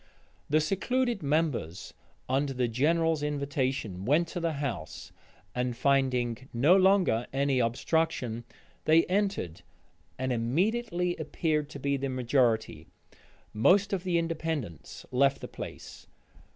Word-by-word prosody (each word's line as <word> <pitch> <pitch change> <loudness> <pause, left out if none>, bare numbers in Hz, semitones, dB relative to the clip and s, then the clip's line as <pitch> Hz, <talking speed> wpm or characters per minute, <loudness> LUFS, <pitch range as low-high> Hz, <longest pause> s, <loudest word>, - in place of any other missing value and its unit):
The 155 +2 +4
secluded 235 +7 0
members, 140 - -1 0.3
upon 135 +3 +1
the 130 -2 -1
general's 160 +6 +1
invitation, 135 -9 -2
went 150 +9 +2
to - - -4
the 165 -1 -1
house, 140 - -5 0.4
and 125 -1 -2
finding 130 -2 +1
no 140 +10 +4
longer 190 - +3
any 135 -1 +1
obstruction, 120 -1 0 0.4
they 160 +1 +5
entered, 195 - -1 0.6
and 130 -1 -1
immediately 180 - 0
appeared 150 -3 -1
to 140 - -8
be 140 +1 0
the 135 0 -3
majority: 125 -3 0 0.7
most 190 - +4
of 185 -2 -1
the 180 -2 +1
Independents 160 - -4
left 135 +2 +3
the - - -7
place. - - -9
140 Hz, 120 wpm, -29 LUFS, 125-165 Hz, 0.7 s, they